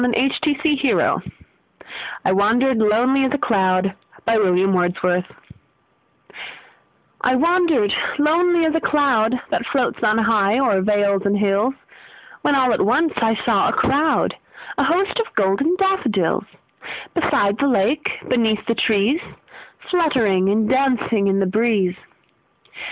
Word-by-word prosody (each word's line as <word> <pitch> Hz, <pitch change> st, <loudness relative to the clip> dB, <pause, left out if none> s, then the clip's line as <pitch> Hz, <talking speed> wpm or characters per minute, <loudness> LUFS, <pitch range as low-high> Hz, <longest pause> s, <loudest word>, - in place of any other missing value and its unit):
William 245 Hz, +2 st, +1 dB
Wordsworth 295 Hz, -2 st, 0 dB, 1.0 s
I -, -, +2 dB
Wandered 225 Hz, +6 st, +2 dB
Lonely 240 Hz, +6 st, +2 dB
As 265 Hz, +2 st, 0 dB
a -, -, 0 dB
Cloud 190 Hz, -5 st, 0 dB, 0.3 s
I 230 Hz, -1 st, +2 dB, 3.0 s
WANDERED 330 Hz, -, +2 dB, 0.2 s
lonely 335 Hz, +3 st, +2 dB
as 315 Hz, -, 0 dB
a 325 Hz, -, 0 dB
cloud 255 Hz, -6 st, +1 dB
That -, -, -2 dB
floats 260 Hz, -3 st, -2 dB
on 215 Hz, +1 st, +2 dB
high 220 Hz, -2 st, +2 dB
o'er 205 Hz, -8 st, +1 dB
vales 200 Hz, -1 st, +1 dB
and 200 Hz, +1 st, +1 dB
hills, 205 Hz, +5 st, 0 dB, 0.7 s
When 285 Hz, -, +1 dB
all 255 Hz, -3 st, +2 dB
at -, -, 0 dB
once 285 Hz, +10 st, +1 dB
I 225 Hz, -1 st, +1 dB
saw -, -, +1 dB
a -, -, -2 dB
crowd, 300 Hz, +3 st, +1 dB, 0.4 s
A -, -, +3 dB
host, 380 Hz, +7 st, 0 dB
of 460 Hz, -, -4 dB
golden 210 Hz, -, +1 dB
daffodils; 365 Hz, -, 0 dB, 0.7 s
Beside 205 Hz, -, 0 dB
the 280 Hz, -, +1 dB
lake, 260 Hz, +5 st, 0 dB
beneath 220 Hz, -3 st, 0 dB
the 230 Hz, -, 0 dB
trees, 225 Hz, -, +1 dB, 0.6 s
Fluttering 250 Hz, -, +1 dB
and 215 Hz, +1 st, +1 dB
dancing 250 Hz, -5 st, 0 dB
in 195 Hz, 0 st, +1 dB
the 195 Hz, -, +1 dB
breeze. 200 Hz, -2 st, 0 dB
240 Hz, 125 wpm, -19 LUFS, 205-290 Hz, 3.0 s, A